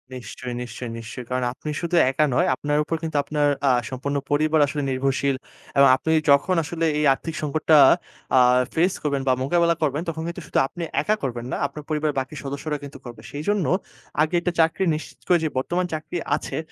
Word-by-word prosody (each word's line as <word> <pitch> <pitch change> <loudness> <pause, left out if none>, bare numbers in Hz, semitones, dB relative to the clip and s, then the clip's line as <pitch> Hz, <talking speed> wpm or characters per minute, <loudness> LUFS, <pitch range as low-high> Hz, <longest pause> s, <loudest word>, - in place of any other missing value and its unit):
নিশ্চয়ই, 125 0 -7
নিশ্চয়ই, 120 0 -6
নিশ্চয়ই। 120 +2 -8
কারণ 125 0 -1
আপনি 150 - -7
শুধু 170 +1 -1
একা 135 +3 +2
নয়, - - +2
আপনার 145 +2 -1
উপর 165 +2 -2
কিন্তু 160 -2 -2
আপনার 150 0 0 0.2
আ - - +6 0.2
সম্পূর্ণ 140 +2 -3
পরিবার 155 +1 +3
আসলে 145 +1 -3
নির্ভরশীল। 135 +1 0 0.4
এবং 140 - +7
আপনি 160 - -2 0.2
যখন 140 +6 +4
আসলে 165 +1 -2
এই 150 - +2
আর্থিক 165 +4 -6
সংকটটা 155 +1 +3 0.6
আ - - +8 0.4
ফেস 180 +4 +3
করবেন 140 -2 0
বা 130 - +5
মোকাবেলা 170 +3 +2
করবেন 150 +1 0
তখন 160 0 -4
কিন্তু 170 +1 -5
শুধু - - +1
আপনি 175 - -7 0.2
একা 215 - +1
করবেন 120 -2 -3
না, - - -1
আপনার 150 +2 -10
পরিবারের 155 -1 0
বাকি 130 +3 -5
সদস্যরা 140 +2 -3
কিন্তু 140 -1 -9
করবে। 120 -1 -9
সেইজন্য 175 +6 -1 0.6
আগে 155 +3 +1
একটা 180 - 0
চাকরি 160 +4 +3
নিশ্চিত 155 - -8
করে 180 - +5
যে 155 - +1
বর্তমান 175 +7 0
চাকরি 155 +2 -4 0.2
আছে - - -5
150 Hz, 190 wpm, -23 LUFS, 135-160 Hz, 0.6 s, আ